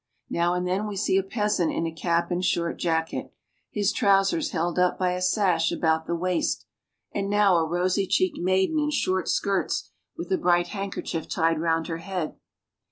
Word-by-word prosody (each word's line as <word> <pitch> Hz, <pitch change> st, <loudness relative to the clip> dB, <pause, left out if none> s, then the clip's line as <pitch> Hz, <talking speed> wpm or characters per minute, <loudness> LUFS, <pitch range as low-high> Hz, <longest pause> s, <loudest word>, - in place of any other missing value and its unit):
Now 175 Hz, +1 st, +1 dB
and 180 Hz, 0 st, -1 dB
then 195 Hz, +4 st, -1 dB
we 205 Hz, -, -5 dB
see 190 Hz, 0 st, +1 dB
a -, -, -1 dB
peasant 210 Hz, -4 st, 0 dB
in 165 Hz, -, -1 dB
a 165 Hz, -, -2 dB
cap 170 Hz, +1 st, -1 dB
and 175 Hz, +1 st, -1 dB
short 170 Hz, -2 st, 0 dB
jacket, 160 Hz, -1 st, -1 dB, 0.4 s
his 205 Hz, -1 st, 0 dB
trousers 200 Hz, +9 st, +2 dB
held 175 Hz, +1 st, -1 dB
up 180 Hz, 0 st, +2 dB
by 180 Hz, -1 st, +1 dB
a 180 Hz, 0 st, -3 dB
sash 180 Hz, -3 st, +2 dB
about 160 Hz, -1 st, 0 dB
the 170 Hz, -, 0 dB
waist, 180 Hz, +1 st, -1 dB, 0.5 s
and 200 Hz, -1 st, -2 dB
now 205 Hz, -3 st, +4 dB
a 165 Hz, -1 st, +1 dB
rosy 180 Hz, +3 st, 0 dB
cheeked 365 Hz, -, +1 dB
maiden 190 Hz, -, +2 dB
in 300 Hz, 0 st, +1 dB
short 185 Hz, -, 0 dB
skirts, 200 Hz, -1 st, 0 dB, 0.3 s
with -, -, -6 dB
a 375 Hz, -, +2 dB
bright 175 Hz, -, +2 dB
handkerchief 195 Hz, -4 st, -4 dB
tied 165 Hz, -2 st, +1 dB
round 165 Hz, -1 st, +1 dB
her 165 Hz, 0 st, -4 dB
head. 175 Hz, -2 st, -4 dB
180 Hz, 185 wpm, -26 LUFS, 170-195 Hz, 0.5 s, now